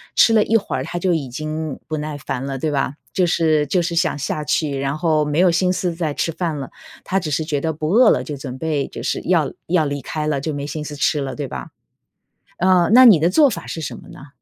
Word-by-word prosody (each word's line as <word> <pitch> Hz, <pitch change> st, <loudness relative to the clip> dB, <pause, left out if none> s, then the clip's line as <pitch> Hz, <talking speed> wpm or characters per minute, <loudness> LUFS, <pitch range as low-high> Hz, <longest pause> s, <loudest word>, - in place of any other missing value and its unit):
吃 230 Hz, -, +6 dB
了 220 Hz, -, +5 dB
一 225 Hz, -, +1 dB
会 210 Hz, -, 0 dB
儿 130 Hz, -, -3 dB
他 175 Hz, -, -5 dB
就 180 Hz, 0 st, +1 dB
已 150 Hz, -5 st, -2 dB
经 155 Hz, +3 st, -4 dB
不 155 Hz, -, -4 dB
耐 150 Hz, -1 st, -4 dB
烦 135 Hz, -1 st, -4 dB
了， 135 Hz, -1 st, -4 dB
对 155 Hz, +4 st, -2 dB
吧？ 140 Hz, -1 st, -1 dB, 0.2 s
就 185 Hz, -, +1 dB
是 155 Hz, -3 st, +2 dB
就 180 Hz, +3 st, +1 dB
是 170 Hz, 0 st, -2 dB
想 165 Hz, -3 st, +1 dB
下 150 Hz, +2 st, -3 dB
去， 150 Hz, -1 st, 0 dB
然 140 Hz, +2 st, -2 dB
后 155 Hz, -2 st, +1 dB
没 150 Hz, +1 st, -2 dB
有 180 Hz, -1 st, +5 dB
心 180 Hz, +2 st, +1 dB
思 180 Hz, -2 st, -1 dB
再 165 Hz, -3 st, -2 dB
吃 165 Hz, -, -1 dB
饭 165 Hz, -2 st, -3 dB
了， 135 Hz, -2 st, -6 dB, 0.3 s
他 195 Hz, -, 0 dB
只 165 Hz, -4 st, -4 dB
是 150 Hz, +2 st, 0 dB
觉 150 Hz, -2 st, -2 dB
得 160 Hz, +2 st, -2 dB
不 155 Hz, 0 st, -3 dB
饿 225 Hz, +5 st, +6 dB
了 -, -, +2 dB
就 145 Hz, -3 st, -6 dB
准 130 Hz, -1 st, -7 dB
备 150 Hz, -2 st, -1 dB
就 -, -, -8 dB
是 -, -, -1 dB
要 165 Hz, -5 st, +2 dB, 0.2 s
要 170 Hz, -1 st, +2 dB
离 145 Hz, -1 st, -3 dB
开 150 Hz, +4 st, -4 dB
了， 150 Hz, -2 st, 0 dB
就 155 Hz, +3 st, -3 dB
没 140 Hz, 0 st, -4 dB
心 150 Hz, +1 st, -5 dB
思 150 Hz, -, -6 dB
吃 150 Hz, +1 st, +1 dB
了， 135 Hz, -1 st, -4 dB
对 145 Hz, -, -4 dB
吧？ -, -, -7 dB, 0.9 s
呃， 180 Hz, -1 st, +4 dB
那 255 Hz, -, +9 dB
你 215 Hz, -10 st, +8 dB
的 165 Hz, +3 st, +3 dB
做 285 Hz, +9 st, +5 dB
法 -, -, -6 dB
是 160 Hz, -, -5 dB
什 -, -, -5 dB
么 -, -, -15 dB
呢？ 140 Hz, -, -12 dB
155 Hz, 285 characters per minute, -20 LUFS, 145-175 Hz, 0.9 s, 那